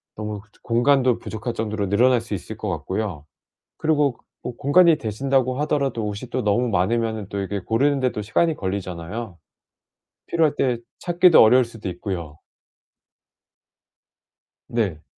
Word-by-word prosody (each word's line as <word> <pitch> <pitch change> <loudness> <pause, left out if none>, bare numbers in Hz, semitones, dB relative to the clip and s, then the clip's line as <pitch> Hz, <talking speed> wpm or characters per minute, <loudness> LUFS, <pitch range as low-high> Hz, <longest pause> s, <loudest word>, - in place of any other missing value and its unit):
너무 105 -1 -5 0.2
공간도 125 +1 +3
부족할 110 +2 -5
정도로 105 -3 -2
늘어날 120 +3 +4
수 115 - -7
있을 90 - -8
것 - - -4
같고요. 95 -7 -4 0.5
그리고 145 -5 +1 0.3
뭐 125 - -5
공간이 165 +3 +5
되신다고 130 +2 0
하더라도 140 -6 0
옷이 105 +4 -6
또 130 0 -1
너무 110 +4 +2
많으면 110 +1 0
또 100 - -4
이게 100 0 -3
고르는데도 130 +3 0
시간이 160 +10 +1
걸리잖아요. 95 +1 -5 0.9
필요할 160 -3 +2
때 125 -3 +1 0.2
찾기도 175 -1 +5
어려울 125 +3 +6
수도 115 -4 -8
있고요. 85 -4 -5 2.3
네. 100 -10 -2
115 Hz, 300 characters per minute, -22 LUFS, 100-130 Hz, 2.3 s, 어려울